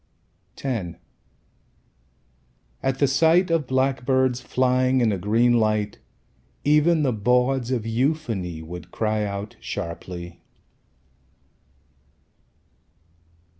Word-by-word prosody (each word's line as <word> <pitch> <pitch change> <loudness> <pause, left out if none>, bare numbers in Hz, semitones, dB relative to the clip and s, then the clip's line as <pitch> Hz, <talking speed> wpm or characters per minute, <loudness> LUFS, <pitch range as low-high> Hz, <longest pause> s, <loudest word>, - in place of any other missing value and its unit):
X 110 -11 -3 1.8
At 135 -1 0
the 140 - +3
sight 165 +6 +3
of 160 -5 +1
blackbirds 130 -1 +1
Flying 130 0 +2
in 115 -3 +3
a 100 - -1
green 115 +5 +3
light 105 -3 0 0.6
Even 150 +2 +3
the 130 -3 +1
bawds 125 +3 +1
of 120 -4 -1
euphony 115 - -1
Would 90 +2 -9
cry 110 -1 -1
out 100 +1 -5
sharply. 85 -2 -6
125 Hz, 90 wpm, -24 LUFS, 105-135 Hz, 1.8 s, the